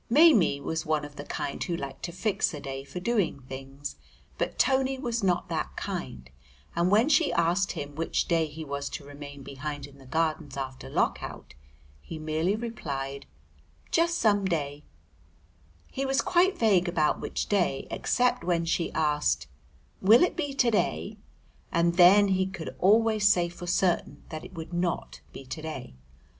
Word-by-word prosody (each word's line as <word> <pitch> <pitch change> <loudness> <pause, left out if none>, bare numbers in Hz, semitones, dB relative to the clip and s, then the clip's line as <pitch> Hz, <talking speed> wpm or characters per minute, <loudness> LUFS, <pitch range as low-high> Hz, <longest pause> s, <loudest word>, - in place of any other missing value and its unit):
Maimie 245 - +6
was 160 +2 -3
one 155 -1 0
of 145 0 -11
the 145 - -6
kind 140 - -3
who 170 -2 -2
like 135 -2 -7
to 170 - -4
fix 185 -2 0
a - - -6
day 135 -1 -6
for 160 +6 -7
doing 200 -8 0
things, 135 +2 -8 0.4
but - - -2
Tony 265 0 +2
was 240 -3 -2
not 180 -2 +1
that - - -3
kind, 65 0 -5 0.5
and 170 +2 +2
when 215 +6 +4
she 310 +1 +4
asked 175 +4 +2
him 145 -3 -6
which 165 +3 -1
day 165 -2 +2
he 155 +1 -8
was 140 0 -4
to 145 - -7
remain 145 -1 -10
behind 145 +1 -5
in 140 -1 -15
the 135 - -15
Gardens 155 -1 -1
after 130 -1 -5
Lock - - +1
out - - -8 0.5
he 160 - -8
merely 155 +5 0
replied, 140 -12 -5 0.6
"Just 335 +1 +2
some 205 -6 +3
day;" 150 -5 -2 1.0
he 270 - -4
was 270 0 +2
quite 375 +1 +3
vague 195 -6 +3
about 160 -3 +1
which - - -2
day 180 -9 +1
except 245 -7 +1
when 170 -1 +1
she 170 0 0
asked 150 - +1 0.6
"Will 220 - +7
it 360 - +1
be 290 -5 -2
to 245 -3 +3
day?" 80 - -1 0.5
and 170 0 +2
then 195 +3 +7
he 190 0 +2
could 175 -4 -7
always 215 +1 +4
say 175 -3 +3
for 175 +1 -9
certain 175 -5 0
that 155 0 -6
it - - -11
would 165 +1 -7
not 170 - -2
be 135 - -10
to 155 +5 -6
day. 155 - -6
170 Hz, 175 wpm, -28 LUFS, 145-205 Hz, 1.0 s, Will